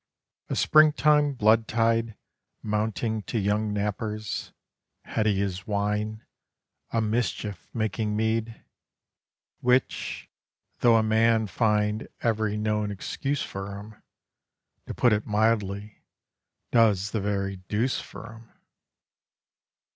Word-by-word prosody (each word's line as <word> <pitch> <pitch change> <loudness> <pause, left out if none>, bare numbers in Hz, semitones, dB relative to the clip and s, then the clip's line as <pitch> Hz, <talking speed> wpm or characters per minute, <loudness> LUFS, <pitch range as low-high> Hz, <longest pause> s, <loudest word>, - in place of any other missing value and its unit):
A - - -1
spring 155 -1 +5
time 150 -1 +3
blood 110 -1 +3
tide, 115 -1 +1 0.5
mounting 110 +1 -1
to 120 - -1
young 105 +1 0
nappers, 105 +1 -3 0.5
Heady 105 -3 0
as 95 0 -4
wine, 105 +1 -2 0.6
a 115 - 0
mischief 110 -2 -2
making 110 -1 -1
mead, 110 +1 -1 1.0
Which 125 +1 0 0.5
though 120 -1 +5
a 110 - +3
man 110 0 +3
find 105 0 0
every 110 -2 0
known 105 -1 0
excuse 135 +7 -3
for 100 +1 -6
'em 105 +1 -12 0.9
To - - -5
put 120 -3 +4
it 105 0 -1
mildly, 105 -1 0 0.7
does 105 -4 +3
the 110 - -1
very 100 -1 -2
deuce 105 +7 -1
for - - -10
'em. 115 0 -16
110 Hz, 110 wpm, -26 LUFS, 105-115 Hz, 1.0 s, spring